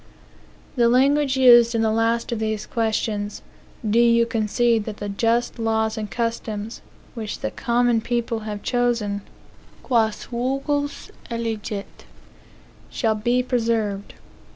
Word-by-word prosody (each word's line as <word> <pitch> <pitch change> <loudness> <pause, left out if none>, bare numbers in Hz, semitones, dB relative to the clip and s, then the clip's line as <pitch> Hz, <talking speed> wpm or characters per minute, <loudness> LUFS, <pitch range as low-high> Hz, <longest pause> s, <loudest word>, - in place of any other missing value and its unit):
The 235 -1 +4
language 270 +2 +3
used 240 -2 +7
in 225 - +2
the 220 - +2
last 230 +1 0
of 235 - -2
these 220 -1 -2
questions, 215 -2 -2 0.4
"Do 220 +3 +3
you 235 0 +5
concede 225 0 +1
that 215 -2 -6
the 205 - -5
just 230 +4 0
laws 220 -1 0
and 215 -2 -4
customs, 225 0 -3 0.3
which 220 -3 -6
the - - -2
common 240 -2 +1
people 235 -1 -1
have 210 -1 -6
chosen, 235 -5 0 0.6
(quas 220 -4 +1
vulgus 275 +4 -2 0.2
elegit,) 220 -3 -5 0.8
shall 225 -3 0
be 240 +4 +1
preserved?" 225 -5 -1
230 Hz, 125 wpm, -23 LUFS, 215-240 Hz, 0.8 s, used